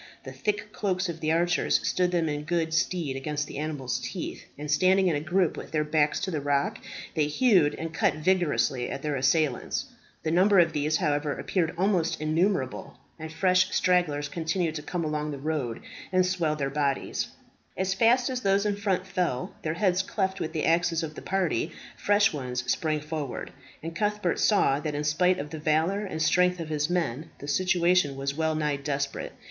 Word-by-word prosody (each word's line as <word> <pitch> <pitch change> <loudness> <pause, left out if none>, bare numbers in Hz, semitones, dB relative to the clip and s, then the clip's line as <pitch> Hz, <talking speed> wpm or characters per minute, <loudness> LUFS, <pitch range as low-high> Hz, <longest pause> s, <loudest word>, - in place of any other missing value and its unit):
The 130 - -8
thick 205 +8 -2
cloaks 185 -2 -1
of 165 -1 -5
the 155 -1 0
archers 175 +2 +2
stood 180 -1 +2
them 170 -2 +1
in 150 -1 -2
good 165 -1 0
stead 165 -4 0
against 150 +2 -2
the 140 - -7
animals' 135 -5 -2
teeth, 170 +7 -6
and 150 +1 -4
standing 185 +3 +4
in 160 - +1
a - - 0
group 175 +2 +1
with - - -8
their 155 -1 0
backs 150 -1 +1
to 190 - -2
the 155 -3 -2
rock, 140 0 0 0.3
they 150 -2 +1
hewed 180 - +3
and 165 0 -5
cut - - +2
vigorously 155 -6 +1
at 140 - -5
their 150 -1 -1
assailants. 135 +1 +1 0.4
The 160 - -1
numbers 185 +1 +5
of - - -9
these, 150 +1 +1
however, 145 -3 0
appeared 160 +4 -1
almost 175 -4 +1
innumerable, 155 -2 -1 0.2
and 160 0 -6
fresh 185 +2 +3
stragglers 165 -5 +2
continued 165 +2 -1
to 155 - -5
come 170 +2 -3
along 150 0 -2
the 145 - -4
road, 140 -5 -3 0.3
and 185 -1 +3
swell 170 -4 0
their 140 -2 -2
body. 140 -1 -1 0.6
As 190 0 0
fast 240 +4 +3
as 250 -1 -3
those 200 0 +2
in 205 -1 0
front 190 -3 0
fell, 180 -9 -2
their 155 0 -2
heads 185 0 +2
cleft 190 0 -2
with 160 - -3
the 160 -2 -1
axes 165 0 +2
of 155 -1 -5
the - - -9
party, 180 -4 -1 0.2
fresh 205 0 +3
ones 125 -3 -3
sprang 155 -2 0
forward; 150 -3 -5 0.3
and 165 +1 -5
Cuthbert 210 -3 0
saw 145 -10 +3
that 150 0 -3
in 145 - -2
spite 180 +5 +2
of 150 -4 -6
the 160 - -5
valour 160 +7 +1
and 160 -5 -5
strength 180 +2 +3
of 165 -2 -5
his 150 0 0
men, 160 -4 -1
the 145 - -9
situation 175 -2 +2
was 140 0 -2
well 160 +1 0
nigh 150 -2 0
desperate. 140 0 -3
160 Hz, 195 wpm, -27 LUFS, 150-185 Hz, 0.6 s, numbers